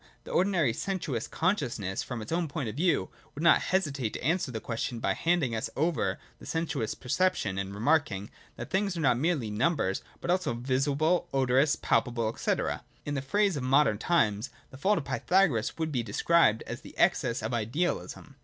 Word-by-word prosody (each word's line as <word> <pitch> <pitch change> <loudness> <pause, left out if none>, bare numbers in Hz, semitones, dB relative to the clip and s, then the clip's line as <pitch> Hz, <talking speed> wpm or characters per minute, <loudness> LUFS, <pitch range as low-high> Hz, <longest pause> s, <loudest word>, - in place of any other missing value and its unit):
The - - -9
ordinary 175 - +2
sensuous 155 - -3
conscious 165 - 0
ness, 95 -2 -3
from 120 -4 -5
its 105 - -9
own 170 0 0
point 140 -3 -4
of 110 - -5
view, 170 +4 +1 0.2
would 150 - -5
not 170 - +6
hesitate 145 - -1
to - - -6
answer 165 -2 +1
the 110 - -4
question 115 +1 -3
by - - +1
handing 165 -8 +1
us 110 - -2
over 160 +3 0 0.2
to - - -12
sensuous 160 -9 -2
per 125 - -14
ception, 135 - +1
and 100 0 -6
remarking, 105 -3 0 0.2
that - - -8
things 195 -1 0
are - - -2
not 125 -5 +3
merely 145 -8 0
numer 125 - +1
able, - - -4 0.2
but 175 - -1
also 180 -9 0
visible, 140 +7 +1
odorous, 135 +3 +3
palpable, 115 -3 0
&c. - - -1 0.5
In 145 - -2
the 140 - -1
phrase 200 +7 +1
of 140 - -3
modern 130 -4 +3
times, 110 -8 +1 0.2
the 130 - -11
fault 205 +6 +3
of 155 - -3
Pythagoras 145 - +1
would 160 -1 -2
be 125 -4 0
described 115 +2 +3
as - - -7
an - - -11
excess 115 -3 +2
of 110 +2 -2
idealism. 135 +4 -2
140 Hz, 190 wpm, -29 LUFS, 115-170 Hz, 0.5 s, not